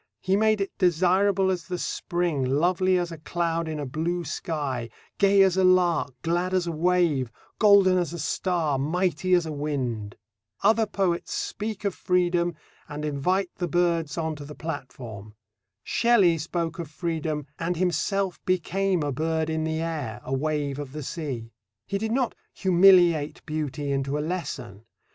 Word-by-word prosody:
He 190 +1 +1
made 215 0 +3
it 195 - -3
desirable 190 +2 +3
as 180 -2 -3
the 180 - -3
spring, 175 -5 -1
lovely 175 +7 +2
as 175 -1 -2
a 165 - -8
cloud 165 0 -1
in 155 -1 -4
a 145 - -3
blue 165 +6 -2
sky, 140 -5 -3 0.3
gay 200 -1 +6
as 190 -1 +2
a 190 - +3
lark, 175 -7 +3
glad 175 +3 0
as 180 -2 +1
a 170 - -2
wave, 165 -6 +1 0.3
golden 200 -3 +6
as 175 -2 -1
a 170 - -5
star, 160 -2 0
mighty 180 +4 +1
as 175 -2 +2
a 160 - -4
wind. 130 -8 -3 0.5
Other 220 +2 +4
poets 185 -4 -1
speak 215 0 -4
of 200 - +1
freedom, 175 -2 +1 0.3
and 150 +1 -5
invite 175 +6 0
the 175 - -1
birds 170 -2 0
on 160 -1 -1
to 145 - -8
the 145 +1 -9
platform. 120 -9 -7 0.5
Shelley 200 -9 +3
spoke 165 +1 -3
of 165 -3 -5
freedom 155 -2 -3
and 170 +1 -1
himself 185 +2 0
became 185 -1 0
a 145 - -1
bird 160 +3 -1
in 160 0 -1
the 160 0 -1
air, 150 -10 -3
a 130 - -3
wave 145 0 -1
of 140 -2 -6
the 150 -1 -5
sea. 130 -7 -5 0.3
He 200 - -2
did 220 +1 -2
not 250 0 +1 0.2
humiliate 175 -5 +4
beauty 150 -2 -3
into 135 +1 -1
a - - -1
lesson. 130 - -5
170 Hz, 165 wpm, -26 LUFS, 150-185 Hz, 0.5 s, gay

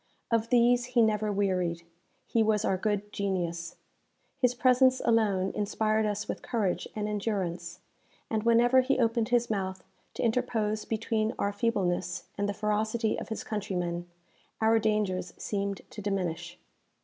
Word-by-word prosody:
Of 230 0 +1
these 245 0 +4
he - - +8
never 215 -1 +1
wearied. 180 -4 0 0.4
He 230 - +1
was 215 -1 +2
our 190 - +2
good 205 +1 -2
genius. 175 -4 -2 0.6
His 250 -2 +2
presence 255 +1 +4
alone 205 -5 +2
inspired 215 +1 +1
us 210 0 -2
with - - -4
courage 215 -7 -1
and 210 -1 -2
endurance; 190 -5 -2 0.5
and 220 -1 -1
whenever 240 +3 +5
he 265 +2 +1
opened 230 -1 +1
his 240 -1 +2
mouth 190 -2 -2 0.3
to - - -2
interpose 220 -3 0
between 220 0 -1
our 200 0 0
feebleness 185 -5 -1
and 205 0 -1
the - - -1
ferocity 215 +2 0
of - - -7
his 220 - -4
countrymen, 180 -5 -3 0.5
our 225 0 +4
dangers 200 -5 0
seemed 200 -1 -3
to 210 - -7
diminish. 175 -4 -3
210 Hz, 145 wpm, -29 LUFS, 190-230 Hz, 0.6 s, he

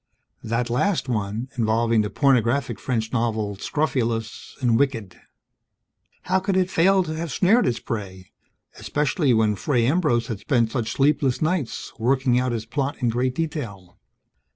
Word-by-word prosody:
That 115 +2 -1
last 170 +5 0
one, 110 0 -2
involving 115 0 +2
the 105 - -2
pornographic 135 0 +1
French 115 -4 -2
novel 110 -4 -1
so - - -17
scrofulous 115 -7 -2
and 120 -4 +2
wicked. 115 -10 -2 1.0
How 185 +1 +1
could 190 0 -1
it 185 0 +1
failed 190 +2 +3
to 155 - -4
have 165 -1 -4
snared 200 - +3
its 120 - 0
prey? 95 -4 -6 0.5
Especially, 150 0 0
when 110 -2 +3
Fray 120 +4 0
Ambrose 135 -5 +2
had 110 -3 -5
spent 115 -4 +1
such 115 -3 -2
sleepless 140 -2 +2
nights, 155 -6 -2
working 125 +1 +2
out 130 0 0
his 115 -2 -3
plot 140 +4 -2
in 125 -3 +1
great 125 +2 -1
detail? 115 - -5
125 Hz, 155 wpm, -23 LUFS, 115-145 Hz, 1.0 s, failed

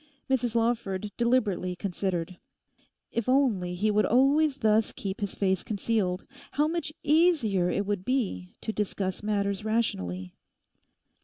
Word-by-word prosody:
Mrs 245 -3 0
Lawford 220 -4 0
deliberately 215 -7 +1
considered. 180 -2 -3 0.7
If 235 +1 -2
only 220 -10 +2
he 210 +4 +1
would 210 0 +3
always 275 +4 +4
thus 220 -3 +2
keep 195 -1 -5
his 200 -1 -3
face 190 -2 +1
concealed, 200 -3 -1 0.3
how 295 +1 +2
much 330 -1 -2
easier 295 - +3
it 200 +3 0
would 200 -2 -2
be 195 - -2
to 220 - -3
discuss 195 -2 -2
matters 200 -1 -1
rationally. 95 - -1
210 Hz, 130 wpm, -28 LUFS, 190-245 Hz, 0.7 s, always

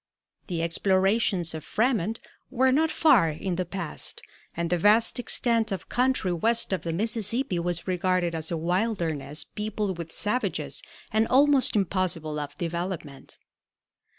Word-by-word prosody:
The 170 -3 -2
explorations 190 +1 +1
of 160 - -6
Frémont 225 -2 0 0.3
were 260 0 +3
not 315 +4 +3
far 255 - +4
in 175 +4 -3
the 185 +1 -2
past, 175 -3 -4 0.3
and 170 0 -2
the 175 - +3
vast 215 +6 +4
extent 230 -2 +1
of 195 - -5
country 250 -7 +1
west 225 +5 +1
of 185 - -1
the 165 - -3
Mississippi 220 +2 -1
was 175 +1 -3
regarded 180 -1 0
as 160 -1 -2
a 170 - -2
wilderness 170 -5 -1
peopled 210 -3 -4
with 165 -1 -6
savages 245 +5 -1 0.3
and 220 +1 +2
almost 275 -1 +4
impossible 175 -6 -1
of 145 0 -6
development. 170 -4 -5
185 Hz, 140 wpm, -26 LUFS, 170-225 Hz, 0.3 s, far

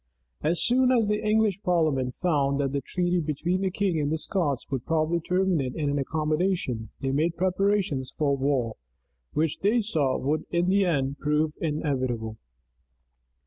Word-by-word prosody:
As 165 +3 +1
soon 255 +1 +3
as 230 -4 +3
the 210 0 0
English 215 -2 +2
parliament 155 -9 +1
found 140 -6 +1
that 135 -2 0
the 140 0 -1
treaty 180 +5 0
between 170 +4 -1
the 190 - +1
king 185 -3 0
and 145 0 -1
the 160 - +1
Scots 155 -6 -1
would 130 -3 -2
probably 165 +1 +1
terminate 180 -6 0
in 145 -3 -1
an 145 - 0
accommodation, 155 -5 -1
they 135 -1 -1
made 160 +5 0
preparations 185 -7 0
for 145 -2 +2
a - - +3
war, 135 -4 0 0.6
which, 155 -1 0
they 215 +5 +3
saw, 155 - 0
would 150 +3 -1
in 175 +1 +1
the 195 0 +3
end 140 -5 0
prove 150 +1 +1
inevitable. 130 -8 -2
155 Hz, 165 wpm, -26 LUFS, 140-185 Hz, 0.6 s, soon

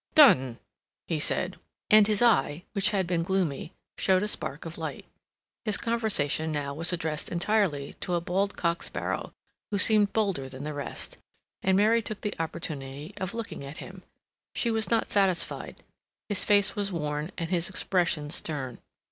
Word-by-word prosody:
"Done!" 135 - +6 0.5
he - - -1
said; - - +1 0.3
and 215 -1 +8
his 215 +1 +3
eye, 160 - +3
which 200 -1 +3
had 195 -3 0
been 170 -1 0
gloomy, 170 -4 -1 0.3
showed 190 0 +3
a - - 0
spark 150 -7 -1
of 165 +1 -7
light. 160 -3 -5 0.6
His 215 -4 +2
conversation 200 -10 +1 0.2
was 165 +4 +2
now - - +1
addressed 155 -2 -2
entirely 175 -6 +1
to 180 - -1
a - - +2
bald 195 +3 -1
cock 170 0 0
sparrow, - - -3 0.4
who 205 - 0
seemed 210 0 +5
bolder 195 -12 0
than 130 +1 -7
the 150 0 -4
rest; 145 -1 -5 0.4
and 190 0 +3
Mary 220 +3 +4
took 215 -1 -6
the 210 - -2
opportunity 145 -3 -5
of 190 +2 -4
looking 230 -10 -5
at 140 +2 -8
him. 185 0 -9 0.5
She 235 - +1
was 220 0 -1
not 230 -1 +1
satisfied; 195 -3 0 0.5
his 205 -3 +2
face 200 -1 +4
was 200 -1 -1
worn, 150 -1 -3
and 165 0 -3
his 175 -1 +1
expression 170 -6 0
stern. 135 -7 -3
180 Hz, 165 wpm, -28 LUFS, 150-205 Hz, 0.6 s, and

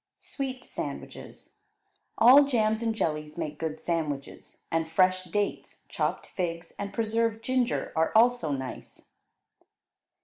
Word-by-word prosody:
Sweet 260 -2 -5
Sandwiches - - -7 0.6
All 260 +6 +8
jams 220 -4 +1
and 225 -1 0
jellies 150 -5 -2
make 155 -3 -4
good 160 -1 -3
sandwiches, 155 -5 -4
and 165 0 0
fresh 185 +2 +3
dates, 205 +3 -3
chopped - - -2
figs, 170 -2 -4
and 200 0 -4
preserved 225 0 0
ginger 255 -1 0
are 160 0 +2
also 230 -8 +4
nice. 130 -2 -6
200 Hz, 115 wpm, -28 LUFS, 160-230 Hz, 0.6 s, All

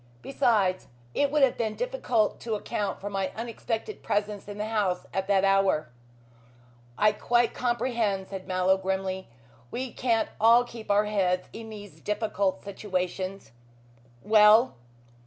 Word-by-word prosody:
Besides, 210 -9 +1 0.3
it 285 - +2
would 295 0 +2
have 265 - +3
been 220 -2 -1
difficult - - 0
to 225 -2 -3
account 205 -1 -3
for 200 - -6
my 195 -2 -2
unexpected 230 - -4
presence 205 -1 -2
in 205 0 -7
the 210 - -2
house 210 -5 -1
at 190 0 -1
that 195 -1 +3
hour." 195 -7 +2 1.1
"I 215 0 +5
quite 240 +3 +1
comprehend!" 235 -5 -1
said 190 -1 -7
Mallow 185 +1 +2
grimly. 190 0 -3 0.4
"We 255 - -4
can't 230 -3 +1
all 230 +3 +6
keep 230 -3 -11
our 205 +1 +4
heads 185 -3 0
in 225 0 -8
these 205 -2 -11
difficult 200 -3 -1
situations. 190 - -4 0.7
Well?" 215 +3 +6
210 Hz, 140 wpm, -27 LUFS, 190-230 Hz, 1.1 s, all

